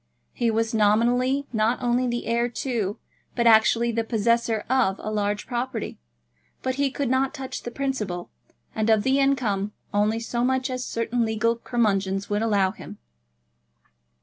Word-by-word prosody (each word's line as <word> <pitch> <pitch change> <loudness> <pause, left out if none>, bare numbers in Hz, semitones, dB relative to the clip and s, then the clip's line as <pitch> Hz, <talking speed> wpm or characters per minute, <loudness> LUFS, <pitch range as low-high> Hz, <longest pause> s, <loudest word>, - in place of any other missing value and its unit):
He 235 -2 0
was 225 +1 0
nominally, 240 +6 +2
not 220 +2 +1
only 245 0 +1
the 240 0 -2
heir 235 +1 +1
to, 230 -5 -2 0.4
but 235 - +1
actually 230 +1 +5
the 230 0 0
possessor 225 0 +1
of, 245 -7 +2
a 215 - -5
large 205 -1 -1
property; 245 -2 -4 0.6
but 260 - 0
he 280 +1 +1
could 280 +1 -2
not 260 +3 +1
touch 265 -2 -6
the - - -5
principal, 235 -9 -3 0.4
and 220 0 0
of 220 -2 +4
the 265 +1 +2
income 215 -8 +1 0.2
only 210 +2 +2
so 235 +1 -2
much 260 +1 0
as 255 0 -3
certain 230 0 -1
legal 225 +1 +1
curmudgeons 200 -5 -1
would 205 +1 +1
allow 200 -4 +2
him. 205 0 -11
230 Hz, 155 wpm, -25 LUFS, 215-250 Hz, 0.6 s, actually